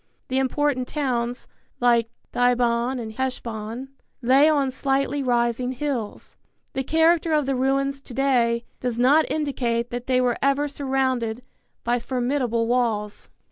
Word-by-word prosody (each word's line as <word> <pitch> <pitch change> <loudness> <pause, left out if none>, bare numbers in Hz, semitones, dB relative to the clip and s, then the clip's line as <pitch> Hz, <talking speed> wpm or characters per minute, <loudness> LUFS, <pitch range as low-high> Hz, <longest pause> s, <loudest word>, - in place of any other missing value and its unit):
The 260 +1 +1
important 265 -1 0
towns, 245 -4 -2 0.3
like 235 -2 +3 0.2
Dibon 245 0 +2
and 220 -2 -5
Heshbon, 235 0 -4 0.3
lay 270 +5 +5
on 280 -4 +2
slightly 275 +1 0
rising 245 0 0
hills. 255 -5 -4 0.4
The 265 - -1
character 325 +2 +3
of 300 -2 +2
the 270 - 0
ruins 275 +1 0
to 265 - -10
day 240 -4 +2
does 245 -2 -2
not 285 +6 +4
indicate 245 -6 -1
that 245 0 -5
they 255 -1 +3
were 250 -2 +1
ever 275 +2 +2
surrounded 260 -4 -1 0.4
by 240 +1 +1
formidable 245 -1 -1
walls. 225 -4 -1
255 Hz, 135 wpm, -24 LUFS, 235-275 Hz, 0.4 s, lay